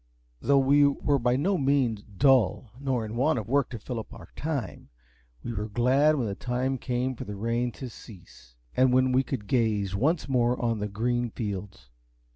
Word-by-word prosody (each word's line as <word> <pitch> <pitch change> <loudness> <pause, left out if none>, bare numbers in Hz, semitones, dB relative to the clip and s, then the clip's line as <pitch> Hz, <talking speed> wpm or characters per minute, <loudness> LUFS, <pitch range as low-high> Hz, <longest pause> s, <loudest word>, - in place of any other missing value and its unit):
Though 140 - +3
we 140 +2 +5
were 140 0 +1
by 125 0 +2
no 180 +7 +1
means 135 -6 +1
dull, 125 +2 +2
nor 130 -5 -1
in 110 +1 -6
want 150 +6 +2
of 110 - -4
work 140 +1 +1
to 120 - -6
fill 115 +2 -5
up 110 - -9
our - - -12
time, 145 -5 -4 0.5
we 120 - -4
were 105 0 -3
glad 130 +8 +3
when 130 -5 -1
the 100 - -2
time 125 +5 -2
came 125 +1 -1
for - - -6
the 105 - -7
rain 115 +4 -1
to 130 - -7
cease, 85 - -14 0.2
and 130 0 +4
when 130 0 +3
we 130 +1 +4
could 130 -5 -5
gaze 105 -4 0
once 150 - +1
more 125 -2 +1
on 115 -2 0
the 105 - -2
green 120 +4 -1
fields. 100 - -6
125 Hz, 195 wpm, -27 LUFS, 110-135 Hz, 0.5 s, we